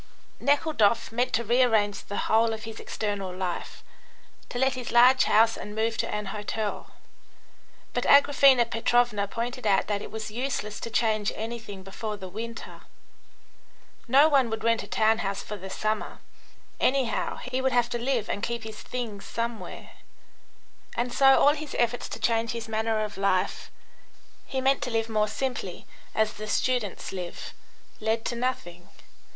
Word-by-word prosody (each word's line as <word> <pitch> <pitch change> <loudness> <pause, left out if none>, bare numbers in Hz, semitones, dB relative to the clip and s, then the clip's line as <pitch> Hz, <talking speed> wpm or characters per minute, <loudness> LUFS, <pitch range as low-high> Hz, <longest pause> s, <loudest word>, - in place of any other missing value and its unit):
Nekhludoff 255 -7 +2
meant 245 +2 0
to 235 - +2
rearrange 225 -3 +2
the 205 - -3
whole 225 +1 +3
of 220 0 -6
his 225 -1 -8
external 205 -3 -3
life, 180 -1 -5 0.7
to - - -5
let 265 +1 +2
his 255 -2 -5
large 250 +2 +6
house 225 +2 +4
and 210 - -8
move 225 +1 0
to - - 0
an 210 0 -3
hotel, 210 0 -4 1.0
but - - -1
Agraphena 275 -3 +6
Petrovna 230 -3 +1
pointed 235 +2 -4
out 195 -1 +3
that 205 -1 -2
it - - -7
was 220 -1 -6
useless 225 -3 -3
to - - -5
change 215 -2 +1
anything 220 -3 -6
before 210 +2 -5
the 190 -2 -8
winter. 225 +5 -7 1.3
No 275 +5 +6
one 275 -6 +3
would 220 0 -4
rent 230 0 +2
a - - -9
town 220 0 +2
house 195 0 -2
for 210 - -6
the 190 -1 -8
summer; 215 +2 -2 0.6
anyhow, 260 -3 +1
he 255 +1 -3
would 265 0 +1
have 245 -1 +2
to 240 - -1
live 240 -3 0
and 200 - -3
keep 235 0 -3
his 220 -1 -8
things 225 -5 -5
somewhere. 230 -1 -5 1.1
And 240 +1 -1
so 270 -1 +6
all 290 - +6
his 305 -2 -6
efforts 240 +1 0
to - - -6
change 230 0 +1
his 230 -1 -5
manner 220 0 0
of 210 -2 -6
life 195 -2 0 0.8
(he 265 - -2
meant 270 +1 +2
to - - -2
live 225 -1 -1
more 215 -1 +1
simply: 225 -5 -4 0.3
as 220 0 +2
the 215 +1 -7
students 245 -4 -1
live) 180 -2 -6 0.5
led 220 +1 -1
to 240 - -2
nothing. 180 -8 -4
225 Hz, 165 wpm, -27 LUFS, 210-245 Hz, 1.3 s, large